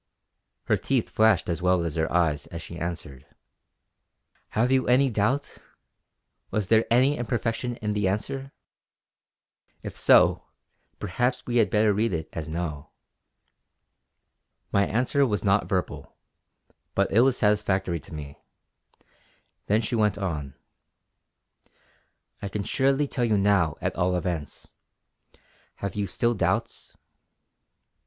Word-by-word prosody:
Her -, -, +1 dB
teeth -, -, -1 dB
flashed 110 Hz, -4 st, +3 dB
as 85 Hz, 0 st, -2 dB
well 90 Hz, -1 st, +2 dB
as 80 Hz, -, -3 dB
her 80 Hz, 0 st, -1 dB
eyes 80 Hz, -4 st, +1 dB
as 85 Hz, -1 st, -8 dB
she 85 Hz, -, -9 dB
answered: 80 Hz, -6 st, -5 dB, 1.3 s
"Have 120 Hz, +4 st, +3 dB
you 130 Hz, -1 st, +2 dB
any 130 Hz, +2 st, +4 dB
doubt? 115 Hz, +7 st, -1 dB, 0.9 s
Was 105 Hz, -3 st, -2 dB
there 110 Hz, 0 st, +4 dB
any 130 Hz, +5 st, +4 dB
imperfection 120 Hz, +1 st, -2 dB
in 105 Hz, 0 st, 0 dB
the 105 Hz, -2 st, 0 dB
answer? 135 Hz, +8 st, -3 dB, 1.3 s
If -, -, -7 dB
so, -, -, +4 dB, 0.5 s
perhaps 125 Hz, +8 st, -1 dB
we 120 Hz, 0 st, -1 dB
had 110 Hz, -4 st, +4 dB
better 105 Hz, 0 st, +3 dB
read 105 Hz, 0 st, 0 dB
it 80 Hz, -1 st, -3 dB
as 80 Hz, -2 st, -5 dB
'no.'" 80 Hz, -3 st, -4 dB, 1.8 s
My 100 Hz, 0 st, +2 dB
answer 130 Hz, +5 st, +1 dB
was 105 Hz, -7 st, 0 dB
not 100 Hz, 0 st, +2 dB
verbal; 95 Hz, -2 st, -3 dB, 0.8 s
but -, -, +1 dB
it 110 Hz, -, +4 dB
was 130 Hz, 0 st, +3 dB
satisfactory 100 Hz, -5 st, +1 dB
to 75 Hz, -, -14 dB
me. 75 Hz, -3 st, -8 dB, 1.3 s
Then 105 Hz, +2 st, +3 dB
she 115 Hz, -, -4 dB
went 105 Hz, -3 st, +2 dB
on: 75 Hz, -9 st, -4 dB, 1.9 s
"I 100 Hz, -, -3 dB
can 100 Hz, +1 st, -3 dB
surely 135 Hz, +5 st, +1 dB
tell 125 Hz, -, -2 dB
you 110 Hz, -3 st, +2 dB
now 100 Hz, -6 st, +2 dB
at -, -, -2 dB
all 90 Hz, +1 st, +1 dB
events. 85 Hz, -4 st, -4 dB, 1.1 s
Have 100 Hz, -, -5 dB
you 100 Hz, -1 st, -2 dB
still 120 Hz, +3 st, 0 dB
doubts?" 105 Hz, -, -2 dB
100 Hz, 130 wpm, -26 LUFS, 85-120 Hz, 1.9 s, any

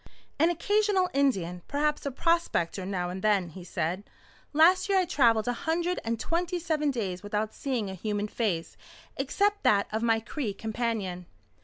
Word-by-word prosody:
"An 325 Hz, +3 st, +5 dB
occasional 385 Hz, +2 st, +2 dB
Indian, 190 Hz, -11 st, +1 dB
perhaps 295 Hz, 0 st, 0 dB
a -, -, -1 dB
prospector 250 Hz, -, 0 dB
now 180 Hz, -2 st, -2 dB
and 185 Hz, +1 st, -6 dB
then," 200 Hz, -4 st, +2 dB
he 180 Hz, +3 st, -10 dB
said. 175 Hz, +2 st, -2 dB, 0.5 s
"Last 340 Hz, +7 st, +5 dB
year 395 Hz, -, +4 dB
I 370 Hz, -, +3 dB
travelled 235 Hz, -9 st, +3 dB
a 245 Hz, -, +1 dB
hundred 340 Hz, +7 st, -1 dB
and 230 Hz, 0 st, -2 dB
twenty 345 Hz, +6 st, -1 dB
seven 315 Hz, -3 st, 0 dB
days 195 Hz, -9 st, -3 dB
without 210 Hz, +1 st, -2 dB
seeing 250 Hz, -7 st, -2 dB
a 190 Hz, -, -5 dB
human 205 Hz, +2 st, -2 dB
face 200 Hz, -7 st, -2 dB, 0.4 s
except 405 Hz, +9 st, 0 dB
that 200 Hz, -, +4 dB
of 220 Hz, +1 st, -1 dB
my 225 Hz, -1 st, +3 dB
Cree 225 Hz, -2 st, -4 dB
companion." 215 Hz, -5 st, -3 dB
230 Hz, 165 wpm, -28 LUFS, 200-325 Hz, 0.5 s, An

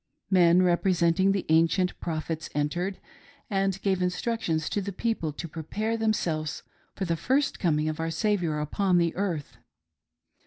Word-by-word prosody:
Men 180 Hz, -1 st, +5 dB
representing 180 Hz, +1 st, +3 dB
the 195 Hz, -1 st, -1 dB
ancient 165 Hz, +3 st, +3 dB
prophets 160 Hz, -1 st, -4 dB
entered, 175 Hz, +6 st, -1 dB, 0.5 s
and 195 Hz, -1 st, 0 dB
gave 190 Hz, -2 st, +1 dB
instructions 180 Hz, -3 st, -1 dB
to 205 Hz, -, -1 dB
the 200 Hz, +1 st, -4 dB
people 195 Hz, -5 st, -2 dB
to 170 Hz, -, -6 dB
prepare 200 Hz, +8 st, -3 dB
themselves 170 Hz, -9 st, -1 dB, 0.3 s
for 195 Hz, -, -2 dB
the 170 Hz, -1 st, 0 dB
first 270 Hz, -, 0 dB
coming 155 Hz, -4 st, +1 dB
of 155 Hz, 0 st, -3 dB
our 165 Hz, 0 st, -1 dB
Saviour 170 Hz, -3 st, 0 dB
upon 180 Hz, +4 st, +1 dB
earth. 175 Hz, -7 st, -3 dB
180 Hz, 140 wpm, -27 LUFS, 160-195 Hz, 0.5 s, Men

